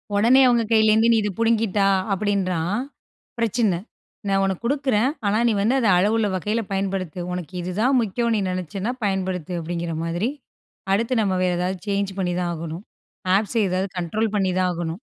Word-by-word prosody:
உடனே 235 Hz, +6 st, +5 dB
அவங்க 240 Hz, -2 st, +3 dB
கையிலருந்து 220 Hz, +1 st, +5 dB
"நீ -, -, +4 dB
இது 205 Hz, -, -1 dB
புடுங்கிட்டா" 225 Hz, -3 st, +2 dB, 0.3 s
அப்டின்றான், 195 Hz, -1 st, 0 dB, 0.6 s
பிரச்சன. 220 Hz, -5 st, +1 dB, 0.5 s
"நான் 195 Hz, 0 st, +2 dB
உனக்கு 190 Hz, +2 st, -3 dB
குடுக்குறேன், 260 Hz, -2 st, +1 dB, 0.2 s
ஆனா 210 Hz, +2 st, +2 dB
நீ -, -, +2 dB
வந்து 225 Hz, +6 st, +2 dB
அத 235 Hz, -, +1 dB
அளவுள்ள 210 Hz, +3 st, +2 dB
வகைல 210 Hz, +5 st, -1 dB
பயன்படுத்து. 190 Hz, -3 st, -2 dB
"உனக்கு 180 Hz, 0 st, -6 dB
இது 180 Hz, +1 st, -4 dB
தான் 260 Hz, +3 st, +3 dB
முக்கியம்ன்னு 230 Hz, +2 st, 0 dB
நீ -, -, 0 dB
நெனைச்சின்னா, 185 Hz, +5 st, -3 dB
பயன்படுத்து" 185 Hz, -3 st, -2 dB
அப்டிங்கிற 170 Hz, 0 st, -3 dB
மாதிரி. 175 Hz, +7 st, -1 dB, 0.6 s
அடுத்து 230 Hz, +5 st, +1 dB
நம்ம 195 Hz, -2 st, 0 dB
வேற 180 Hz, -1 st, +2 dB
ஏதாவது 180 Hz, +1 st, -2 dB
சேஞ்ச் 200 Hz, -1 st, 0 dB
பண்ணி 180 Hz, -2 st, 0 dB
தான் 175 Hz, -1 st, -1 dB
ஆகணும். 165 Hz, +3 st, -6 dB, 0.5 s
ஆப்ஸ் 215 Hz, +3 st, -2 dB
ஏதாவது 185 Hz, +1 st, -1 dB
கண்ட்ரோல் 210 Hz, +6 st, -1 dB
பண்ணி 195 Hz, -2 st, +1 dB
தான் 185 Hz, -1 st, +2 dB
ஆகணும். 170 Hz, +1 st, -4 dB
195 Hz, 165 wpm, -23 LUFS, 180-225 Hz, 0.6 s, உடனே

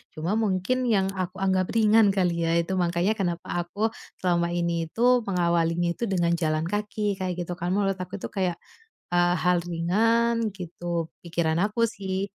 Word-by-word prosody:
cuma 160 Hz, +4 st, -2 dB
mungkin 220 Hz, +5 st, 0 dB
yang 195 Hz, -4 st, +2 dB
aku 185 Hz, -1 st, -4 dB
anggap 185 Hz, -1 st, +2 dB
ringan 220 Hz, -1 st, +5 dB
kali 170 Hz, -3 st, +1 dB
ya 165 Hz, -, +2 dB
itu 170 Hz, +2 st, 0 dB
makanya 175 Hz, +3 st, +1 dB
kenapa 175 Hz, -3 st, -2 dB, 0.2 s
aku 215 Hz, +5 st, -1 dB, 0.3 s
selama 170 Hz, -1 st, +2 dB
ini 170 Hz, -1 st, -1 dB
itu 225 Hz, -, -7 dB, 0.3 s
mengawalinya 170 Hz, -2 st, +1 dB
itu 170 Hz, -, -5 dB
dengan 175 Hz, -4 st, +1 dB
jalan 155 Hz, -2 st, 0 dB
kaki 205 Hz, +2 st, -2 dB
kayak 185 Hz, -1 st, -2 dB
gitu 175 Hz, -, -7 dB
kan 175 Hz, -, -2 dB
menurut 195 Hz, -2 st, 0 dB
aku 185 Hz, -1 st, -5 dB
itu 200 Hz, -, -5 dB
kayak, 185 Hz, -3 st, -1 dB, 0.6 s
eee, 175 Hz, 0 st, +4 dB
hal 180 Hz, 0 st, +3 dB
ringan 225 Hz, +7 st, +2 dB
gitu 175 Hz, -1 st, -3 dB, 0.2 s
pikiran 170 Hz, -1 st, 0 dB
aku 215 Hz, +3 st, +2 dB
sih. 195 Hz, -3 st, -3 dB
180 Hz, 165 wpm, -26 LUFS, 170-205 Hz, 0.6 s, ringan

